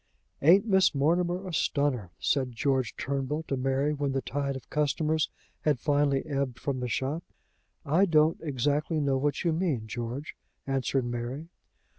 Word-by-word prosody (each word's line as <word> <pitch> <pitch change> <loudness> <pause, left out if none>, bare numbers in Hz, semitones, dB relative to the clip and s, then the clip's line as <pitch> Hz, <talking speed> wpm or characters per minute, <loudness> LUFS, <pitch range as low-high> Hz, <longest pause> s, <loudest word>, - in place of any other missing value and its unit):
"Ain't 180 +8 +6
Miss 190 -6 +4
Mortimer 175 +6 +1
a 180 - -5
stunner?" 140 - 0
said 130 -3 0
George 130 0 0
Turnbull 140 +3 -2
to 140 - -2
Mary, 135 +3 +1
when 140 -2 -1
the 135 - 0
tide 140 -1 -2
of 130 - -8
customers 155 +1 +1 0.3
had 150 -3 +1
finally 145 -1 +2
ebbed 140 -4 -2
from 140 -2 -2
the 125 - -2
shop. 140 +8 -2 0.6
"I 165 +7 +4
don't 155 -2 +3
exactly 150 +2 0
know 140 -2 +1
what 145 0 0
you 170 -2 +2
mean, 155 -10 0
George," 120 +5 -5 0.3
answered 135 -1 0
Mary. 120 +6 -4
140 Hz, 155 wpm, -28 LUFS, 130-155 Hz, 0.6 s, Ain't